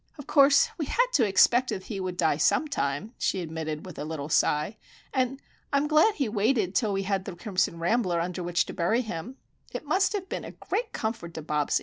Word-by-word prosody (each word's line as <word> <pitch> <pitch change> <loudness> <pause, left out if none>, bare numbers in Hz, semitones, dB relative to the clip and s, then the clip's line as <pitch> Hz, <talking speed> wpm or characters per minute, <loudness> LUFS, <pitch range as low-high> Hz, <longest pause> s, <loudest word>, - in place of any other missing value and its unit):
"Of 290 - -9
course 280 -1 +5
we 305 - -2
had - - +3
to 235 -6 +4
expect 240 +6 +4
that 190 - -3
he 205 -4 -5
would 185 -1 -4
die 160 -4 +2
sometime," 185 - 0
she 190 - 0
admitted, 160 -2 -4
with 180 -3 -9
a - - -3
little 150 -1 -5
sigh. 150 +6 +1 0.4
"And 260 0 0 0.3
I'm 280 +1 +2
glad 315 +8 +4
he 275 - 0
waited 210 -2 +1
till 220 -3 +1
we 195 0 -1
had 195 -1 -1
the 190 - -6
crimson 180 -3 -1
rambler 175 0 +1
under 180 +2 -3
which 175 0 +1
to - - -7
bury 220 +8 +1
him. 220 +3 -6 0.3
It - - -6
must 380 +1 +2
have 390 -2 -3
been - - -4
a - - -8
great 465 -1 -3
comfort 220 -7 -4
to 160 - -5
Bobsie! 150 -1 0
195 Hz, 215 wpm, -27 LUFS, 170-260 Hz, 0.4 s, course